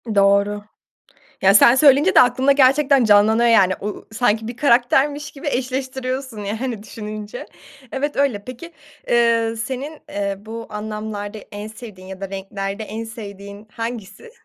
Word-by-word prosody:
Doğru. 200 Hz, +1 st, +3 dB, 0.8 s
Ya, 195 Hz, +1 st, +5 dB
sen 235 Hz, +4 st, +7 dB
söyleyince 295 Hz, +6 st, +5 dB
de -, -, +9 dB
aklımda 260 Hz, +3 st, +3 dB
gerçekten 275 Hz, 0 st, +4 dB
canlanıyor 220 Hz, +3 st, +4 dB
yani. 190 Hz, -5 st, +5 dB
U 205 Hz, -, -3 dB
u 210 Hz, -, -7 dB
sanki 220 Hz, -1 st, 0 dB
bir 240 Hz, +1 st, -7 dB
karaktermiş 285 Hz, +3 st, +2 dB
gibi 285 Hz, +2 st, -9 dB
eşleştiriyorsun 260 Hz, -1 st, -3 dB
yani, 225 Hz, +1 st, -4 dB
düşününce. 215 Hz, -1 st, -7 dB, 0.5 s
Evet 285 Hz, +2 st, -2 dB
öyle. 260 Hz, -8 st, 0 dB
Peki, 295 Hz, +7 st, -9 dB, 0.4 s
eee, 230 Hz, -1 st, +2 dB
senin, 270 Hz, +6 st, -5 dB
eee, 200 Hz, -1 st, -2 dB
bu 225 Hz, +2 st, -8 dB
anlamlarda 210 Hz, 0 st, -6 dB
en 205 Hz, +1 st, -7 dB
sevdiğin 215 Hz, -4 st, -11 dB
ya 190 Hz, 0 st, -9 dB
da 195 Hz, -, -5 dB
renklerde 195 Hz, +2 st, -5 dB
en 220 Hz, +2 st, -6 dB
sevdiğin 205 Hz, -2 st, -10 dB
hangisi? 230 Hz, -, -7 dB
225 Hz, 140 wpm, -20 LUFS, 205-260 Hz, 0.8 s, de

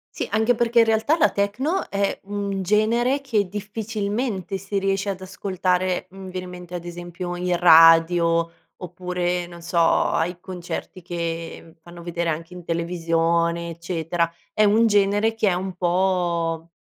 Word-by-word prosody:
Sì, -, -, -2 dB
anche 220 Hz, +3 st, +3 dB
perché 235 Hz, 0 st, +3 dB
in 230 Hz, -, +6 dB
realtà 225 Hz, +8 st, +2 dB
la 325 Hz, -, +4 dB
techno 255 Hz, -, -1 dB
è 200 Hz, 0 st, -1 dB
un 200 Hz, -1 st, -3 dB
genere 230 Hz, +7 st, +2 dB
che, 220 Hz, -8 st, 0 dB
difficilmente, 210 Hz, 0 st, -3 dB
si 195 Hz, +1 st, -3 dB
riesce 195 Hz, +1 st, 0 dB
ad 190 Hz, -1 st, -5 dB
ascoltare, 185 Hz, -1 st, -1 dB
mhmm, 190 Hz, 0 st, -9 dB
viene 185 Hz, 0 st, -5 dB
in -, -, -9 dB
mente, 180 Hz, 0 st, -10 dB
ad 175 Hz, -1 st, -5 dB
esempio, 175 Hz, +1 st, -6 dB
in 180 Hz, 0 st, -1 dB
radio, 165 Hz, 0 st, +6 dB, 0.3 s
oppure, 180 Hz, 0 st, -3 dB
non 170 Hz, 0 st, -12 dB
so, 170 Hz, +1 st, -2 dB
ai 170 Hz, +1 st, +2 dB
concerti 185 Hz, 0 st, -7 dB
che 165 Hz, -1 st, -5 dB
fanno 170 Hz, 0 st, -12 dB
vedere 170 Hz, 0 st, -2 dB
anche 165 Hz, +3 st, -5 dB
in 180 Hz, -1 st, -10 dB
televisione, 170 Hz, 0 st, 0 dB
eccetera. 170 Hz, 0 st, -2 dB, 0.2 s
È 215 Hz, -, +3 dB
un 220 Hz, +3 st, +4 dB
genere 205 Hz, +1 st, +2 dB
che 220 Hz, -2 st, +1 dB
è -, -, +1 dB
un 185 Hz, +1 st, -4 dB
po' 175 Hz, -2 st, 0 dB
180 Hz, 155 wpm, -23 LUFS, 170-205 Hz, 0.3 s, in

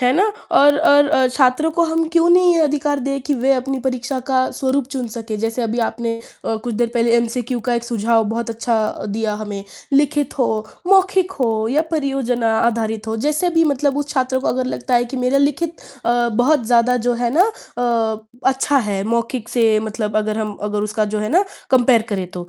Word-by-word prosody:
है 250 Hz, 0 st, +3 dB
ना? 375 Hz, -, +4 dB, 0.3 s
और, 290 Hz, 0 st, +5 dB
और 290 Hz, -2 st, +5 dB
अ, 265 Hz, -3 st, +3 dB
छात्रों 260 Hz, +4 st, +2 dB
को 340 Hz, 0 st, +3 dB
हम 325 Hz, 0 st, 0 dB
क्यों 335 Hz, +1 st, +3 dB
नहीं 355 Hz, 0 st, +5 dB
ये 335 Hz, -, +2 dB
अधिकार 290 Hz, -1 st, 0 dB
दें 275 Hz, +1 st, -2 dB
कि 285 Hz, +2 st, -1 dB
वे 265 Hz, +2 st, +2 dB
अपनी 265 Hz, +1 st, -2 dB
परीक्षा 255 Hz, +1 st, -2 dB
का 260 Hz, -1 st, +1 dB
स्वरूप 270 Hz, 0 st, -1 dB
चुन 255 Hz, -3 st, -3 dB
सकें। 220 Hz, -1 st, -6 dB
जैसे 225 Hz, +3 st, -2 dB
अभी 230 Hz, +1 st, -2 dB
आपने 230 Hz, 0 st, -3 dB, 0.3 s
अ, -, -, -1 dB
कुछ 230 Hz, +1 st, -5 dB
देर 235 Hz, +2 st, 0 dB
पहले 235 Hz, 0 st, +2 dB
एमसीक्यू 240 Hz, +1 st, -2 dB
का 245 Hz, -, +2 dB
एक 235 Hz, 0 st, -2 dB
सुझाव 230 Hz, -1 st, +1 dB
बहुत 230 Hz, +1 st, -3 dB
अच्छा 225 Hz, -1 st, -2 dB
दिया 215 Hz, +1 st, -2 dB
हमें, 205 Hz, -2 st, -6 dB, 0.3 s
लिखित 290 Hz, 0 st, +1 dB
हो, 220 Hz, -4 st, 0 dB, 0.2 s
मौखिक 380 Hz, -1 st, +3 dB
हो 220 Hz, -3 st, +1 dB
या 290 Hz, +6 st, +2 dB
परियोजना 270 Hz, -7 st, 0 dB
आधारित 225 Hz, -2 st, -1 dB
हो। 220 Hz, -, -2 dB
जैसे 305 Hz, +4 st, +1 dB
भी 330 Hz, -, +5 dB
मतलब 285 Hz, -1 st, 0 dB
उस 290 Hz, -, -3 dB
छात्र 260 Hz, -2 st, 0 dB
को -, -, -2 dB
अगर 255 Hz, 0 st, -1 dB
लगता 255 Hz, 0 st, -2 dB
है 240 Hz, 0 st, +3 dB
कि 255 Hz, +2 st, -7 dB
मेरा 255 Hz, +2 st, +1 dB
लिखित 295 Hz, +4 st, 0 dB, 0.3 s
अ, 240 Hz, 0 st, +2 dB
बहुत 245 Hz, +4 st, +2 dB
ज़्यादा 245 Hz, +1 st, +3 dB
जो 245 Hz, -, +2 dB
है 235 Hz, -, +1 dB
ना 360 Hz, -, +5 dB, 0.3 s
अ, 225 Hz, -3 st, 0 dB, 0.3 s
अच्छा 270 Hz, +2 st, +1 dB
है 195 Hz, -1 st, -1 dB
मौखिक 235 Hz, +1 st, -2 dB
से 230 Hz, -2 st, +2 dB
मतलब 215 Hz, -1 st, -3 dB
अगर 215 Hz, 0 st, -1 dB
हम 210 Hz, -1 st, -3 dB
अगर 210 Hz, 0 st, -2 dB
उसका 215 Hz, 0 st, -1 dB
जो -, -, 0 dB
है 215 Hz, -, -2 dB
ना 370 Hz, +5 st, +3 dB, 0.3 s
कम्पेयर 245 Hz, -3 st, +4 dB
करें 190 Hz, -2 st, -2 dB
तो, 175 Hz, -1 st, -8 dB
245 Hz, 210 wpm, -19 LUFS, 225-280 Hz, 0.3 s, और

